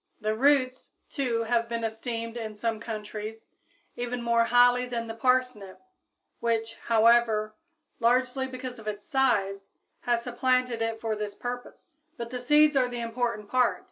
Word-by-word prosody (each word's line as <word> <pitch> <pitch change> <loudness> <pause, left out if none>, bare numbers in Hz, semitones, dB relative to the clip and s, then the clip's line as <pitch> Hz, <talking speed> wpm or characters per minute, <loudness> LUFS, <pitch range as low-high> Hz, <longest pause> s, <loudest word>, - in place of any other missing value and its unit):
The 215 -1 -1
roots, 260 +1 +2 0.2
too, 245 -6 0
have 230 0 0
been 230 -1 -3
esteemed 230 +1 -4
in 220 -2 -5
some 225 +1 -2
countries, 215 0 -6 0.5
even 245 0 -3
more 235 0 +3
highly 245 +1 +4
than 235 -2 -3
the 225 - -6
parsnip, 250 -5 0 0.6
which, 225 -1 -1
however, 225 -1 +4 0.5
largely 255 +3 +2
because 255 -1 -7
of 215 - -11
its 205 -1 -4
size, 200 -7 +1 0.3
has 240 -1 0
supplanted 250 -1 0
it 225 0 -1
for 220 -1 -2
this 210 -1 -5
purpose. 245 +5 -7 0.2
But 235 -1 -6
the 250 -1 -4
seeds 295 +3 +5
are 260 -2 +3
the 245 -1 -5
important 230 -2 -2
part. 250 +2 +2
235 Hz, 150 wpm, -27 LUFS, 225-250 Hz, 0.6 s, seeds